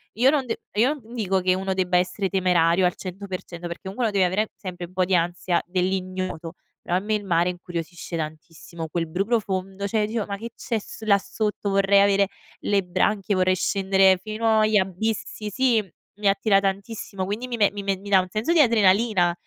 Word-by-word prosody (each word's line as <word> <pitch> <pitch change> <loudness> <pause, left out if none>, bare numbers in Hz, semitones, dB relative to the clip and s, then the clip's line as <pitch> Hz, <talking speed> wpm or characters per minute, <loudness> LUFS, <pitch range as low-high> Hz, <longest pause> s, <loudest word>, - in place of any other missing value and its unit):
io 245 +5 +5
non 280 -2 +1
d 235 - -1 0.2
io 240 +7 +3
non 225 +1 -14
dico 195 -5 +1
che 185 0 +3
uno 190 0 -2
debba 185 -1 0
essere 185 +2 0
temerario 180 -1 +3
al 180 - +1
100% 185 -2 -7
perché 170 0 -8
comunque 195 +6 -4
uno - - -1
deve 195 -2 +3
avere 205 +4 0
sempre 180 -2 -6
un - - -20
po' 185 0 +1
di 185 0 +2
ansia 175 +1 0
dell'ignoto, 185 -2 -2 0.3
però 175 - 0
a - - +1
me 210 +3 -2
il 210 - -3
mare 175 -1 +2
incuriosisce 175 -1 -6
tantissimo. 160 +1 -7
Quel 165 +1 -2
blu 180 +5 -1
profondo, 200 -3 -1
cioè 220 +2 0
io - - +2
dicevo: 220 -1 -2
"Ma 200 -1 -4
che 230 +3 -7
c'è 230 - -2
s 215 - -11
là 200 -2 +5
sotto, 210 +1 -3
vorrei 195 0 +4
avere 200 0 +4 0.3
le 200 -1 +1
branchie, 195 +3 0
vorrei 185 0 +3
scendere 190 0 +3
fino 220 +1 +1
agli 215 0 +4
abissi" 210 +2 -2
sì, 240 0 +2 0.4
mi 210 - 0
attira 195 0 +4
tantissimo 195 0 -3
quindi 210 +6 -4
mi 245 - -3
me 205 -3 +4
mi 205 0 -6
me 195 -1 0
mi 200 +2 -10
dà 195 -1 +6
un 185 - -2
senso 215 - -1
di 340 - +4
adrenalina, 210 - +4
195 Hz, 205 wpm, -24 LUFS, 180-210 Hz, 0.4 s, dà